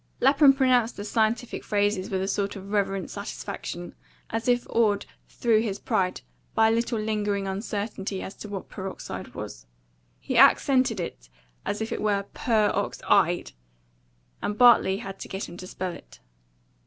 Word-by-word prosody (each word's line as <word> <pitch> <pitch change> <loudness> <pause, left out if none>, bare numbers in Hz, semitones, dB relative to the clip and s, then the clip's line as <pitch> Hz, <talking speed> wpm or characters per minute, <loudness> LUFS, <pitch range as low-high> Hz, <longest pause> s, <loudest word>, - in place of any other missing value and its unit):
Lapham 275 +2 +6
pronounced 255 -4 +2
the 205 - -5
scientific 225 +2 0
phrases 205 -2 0
with 190 -1 -1
a - - -2
sort 200 0 -1
of 195 0 -9
reverent 195 -2 0
satisfaction, 200 -3 -6 0.4
as 225 +1 -2
if 245 0 +2
awed 210 -3 +2 0.2
through 225 -2 +2
his 205 -4 -2
pride 185 -2 -1 0.3
by 220 0 +5
a - - +3
little 230 +1 0
lingering 210 -2 -1
uncertainty 200 0 -3
as 195 - -6
to 210 - -9
what 195 -2 -5
peroxide 190 -1 -7
was. - - -7 0.5
He - - -4
accented 255 -6 +5
it - - -6 0.4
as 205 - -2
if 220 - -3
it - - -2
were 205 -2 +1
purr 220 -4 +2
ox 200 - -2
EYED; 175 -4 +3 0.9
and 210 - -2
Bartley 235 -5 +6
had 195 -3 -7
to - - -7
get 190 +1 -4
him 170 - -10
to 185 - -8
spell 185 0 -4
it. - - -14
205 Hz, 165 wpm, -26 LUFS, 195-225 Hz, 0.9 s, Lapham